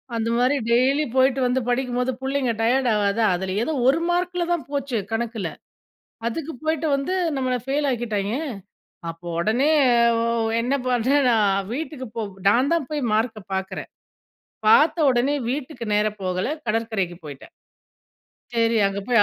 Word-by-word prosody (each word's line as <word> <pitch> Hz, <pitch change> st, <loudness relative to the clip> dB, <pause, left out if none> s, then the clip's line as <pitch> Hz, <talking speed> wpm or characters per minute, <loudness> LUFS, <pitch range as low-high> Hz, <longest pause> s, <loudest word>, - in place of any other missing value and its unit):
அந்த 230 Hz, 0 st, -1 dB
மாரி 255 Hz, +4 st, +2 dB
டெய்லி 270 Hz, +5 st, +3 dB
போய்ட்டு 260 Hz, 0 st, +3 dB
வந்து 250 Hz, +1 st, +1 dB
படிக்கும்போது 250 Hz, 0 st, 0 dB
பிள்ளைங்க 265 Hz, -2 st, 0 dB
டயர்ட் 245 Hz, +2 st, +2 dB
ஆகாதா? 210 Hz, +2 st, +1 dB
அதுல, 190 Hz, +1 st, -3 dB
ஏதோ 315 Hz, -, -2 dB
ஒரு 280 Hz, +5 st, +4 dB
மார்க்குல 355 Hz, 0 st, 0 dB
தான் 340 Hz, -, -3 dB
போச்சு. 280 Hz, -4 st, -2 dB
கணக்குல. 225 Hz, -4 st, -2 dB, 0.8 s
அதுக்கு 315 Hz, +7 st, -3 dB
போய்ட்டு 315 Hz, 0 st, 0 dB
வந்து 275 Hz, +7 st, -2 dB, 0.2 s
நம்மளை 255 Hz, -1 st, 0 dB
ஃபெயில் 280 Hz, +2 st, 0 dB
ஆக்கிட்டாய்ங்க. 220 Hz, -2 st, -2 dB, 0.7 s
அப்போ 165 Hz, +1 st, -9 dB
உடனே 240 Hz, -, +2 dB, 0.5 s
ஒ -, -, +1 dB, 0.4 s
என்ன 250 Hz, +3 st, -1 dB
பண்டேன் 255 Hz, +3 st, +2 dB
நான்? 205 Hz, -4 st, +3 dB
வீட்டுக்கு 295 Hz, -1 st, -5 dB
போ 230 Hz, -, -2 dB, 0.3 s
நான்தான் 270 Hz, +8 st, +3 dB
போய் 300 Hz, -1 st, -2 dB
மார்க்க 220 Hz, 0 st, 0 dB
பார்க்குறேன். 190 Hz, 0 st, -4 dB, 0.8 s
பார்த்த 300 Hz, +9 st, +5 dB
உடனே 255 Hz, +4 st, +1 dB, 0.2 s
வீட்டுக்கு 265 Hz, -3 st, -5 dB
நேரா 210 Hz, +1 st, +2 dB
போகல. 185 Hz, 0 st, -1 dB, 0.2 s
கடற்கரைக்கு 215 Hz, -6 st, -1 dB
போய்ட்டேன். 140 Hz, -2 st, -10 dB, 1.0 s
சரி. 230 Hz, 0 st, +2 dB
அங்கே 200 Hz, 0 st, -4 dB
போய் 235 Hz, -4 st, +5 dB
245 Hz, 135 wpm, -23 LUFS, 220-280 Hz, 1.0 s, பார்த்த